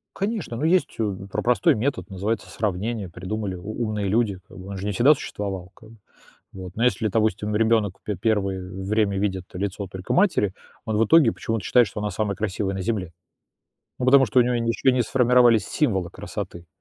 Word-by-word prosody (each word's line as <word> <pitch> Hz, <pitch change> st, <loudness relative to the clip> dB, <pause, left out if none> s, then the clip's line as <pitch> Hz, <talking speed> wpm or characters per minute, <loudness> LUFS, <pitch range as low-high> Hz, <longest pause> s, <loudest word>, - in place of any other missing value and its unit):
Конечно, 200 Hz, -, -3 dB
ну, 125 Hz, -, -4 dB
есть, 175 Hz, +3 st, +2 dB
м, 100 Hz, -3 st, -3 dB
про 100 Hz, -, -3 dB
простой 130 Hz, +6 st, +3 dB
метод, 110 Hz, -6 st, -2 dB
называется 100 Hz, +4 st, -3 dB
сравнение, 105 Hz, 0 st, -2 dB
придумали 95 Hz, +3 st, -4 dB
у 105 Hz, +6 st, -5 dB
умные 105 Hz, -2 st, -2 dB
люди, 105 Hz, -1 st, +1 dB
как -, -, -14 dB
бы 95 Hz, 0 st, -10 dB
он 100 Hz, 0 st, -6 dB
же 95 Hz, -, -5 dB
не 105 Hz, -, -1 dB
всегда 125 Hz, +9 st, +6 dB
существовал 95 Hz, -9 st, -5 dB
как 110 Hz, -, -16 dB
бы, 115 Hz, -, -16 dB, 0.6 s
вот 95 Hz, -2 st, -8 dB
ну 115 Hz, -, 0 dB
если, 120 Hz, -3 st, +2 dB
допустим, 105 Hz, -1 st, 0 dB
ребёнок 110 Hz, -3 st, +2 dB
пе 105 Hz, -, -3 dB
первый 100 Hz, -2 st, 0 dB, 0.2 s
время 100 Hz, -1 st, +1 dB
видит 95 Hz, -2 st, -1 dB
лицо 100 Hz, +1 st, -3 dB
только 95 Hz, -1 st, -4 dB
матери, 175 Hz, -, +2 dB, 0.3 s
он 110 Hz, -2 st, -1 dB
в 110 Hz, -, +4 dB
итоге 145 Hz, -2 st, +5 dB
почему-то 115 Hz, -4 st, -3 dB
считает, 125 Hz, -1 st, +5 dB
что 105 Hz, -, -7 dB
она 105 Hz, 0 st, -2 dB
самая 100 Hz, -1 st, -2 dB
красивая 100 Hz, -1 st, -2 dB
на 95 Hz, -, -3 dB
Земле. 95 Hz, -4 st, -2 dB, 0.9 s
Ну, 125 Hz, -, -2 dB
потому 135 Hz, 0 st, +6 dB
что 110 Hz, -, -2 dB
у -, -, +6 dB
него 125 Hz, +1 st, 0 dB
ещё 115 Hz, +2 st, +1 dB
не 125 Hz, -1 st, +2 dB
сформировались 120 Hz, -1 st, +4 dB
символы 95 Hz, -, 0 dB
красоты, 85 Hz, 0 st, -7 dB
105 Hz, 195 wpm, -24 LUFS, 95-120 Hz, 0.9 s, всегда